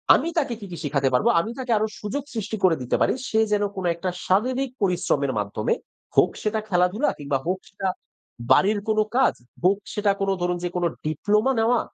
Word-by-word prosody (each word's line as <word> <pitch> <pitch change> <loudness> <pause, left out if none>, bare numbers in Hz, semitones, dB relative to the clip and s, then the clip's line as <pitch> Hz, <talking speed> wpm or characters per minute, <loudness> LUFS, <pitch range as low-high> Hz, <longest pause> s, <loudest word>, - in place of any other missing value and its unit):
আমি - - 0
তাকে 270 -6 +1
কি, 205 - -8
কি 170 - -6
শিখাতে 140 -2 +1
পারব? 125 - +3
আমি 220 +7 -2
তাকে 250 -2 -3
আরও 215 +1 +1
সুযোগ 235 +7 -3
সৃষ্টি 220 -1 -3
করে 180 -3 +5
দিতে 125 - 0
পারি। - - +3 0.2
সে 220 - +2
যেন 205 0 +2
কোনো 185 -2 -2
একটা 185 +2 -3 0.2
শারীরিক 250 +7 +1
পরিশ্রমের 170 -7 +1
মাধ্যমে, 105 +1 -1 0.4
হোক - - +5
সেটা 215 0 0
খেলাধুলা, 180 +9 +2
কিংবা 140 -1 -1
হোক 185 +2 -1
সেটা 195 -1 -4 0.6
বাড়ির 205 +8 +5
কোন 215 0 +2 0.2
কাজ, - - +4 0.3
হোক 195 +2 +4 0.2
সেটা 210 -1 +2
কোনো 195 0 +2
ধরুন 180 0 0
যে 175 - 0
কোনো, 175 -1 +2 0.2
ডিপ্লোমা 210 - +2
নেওয়া। 230 +1 +3
195 Hz, 190 wpm, -24 LUFS, 175-220 Hz, 0.6 s, করে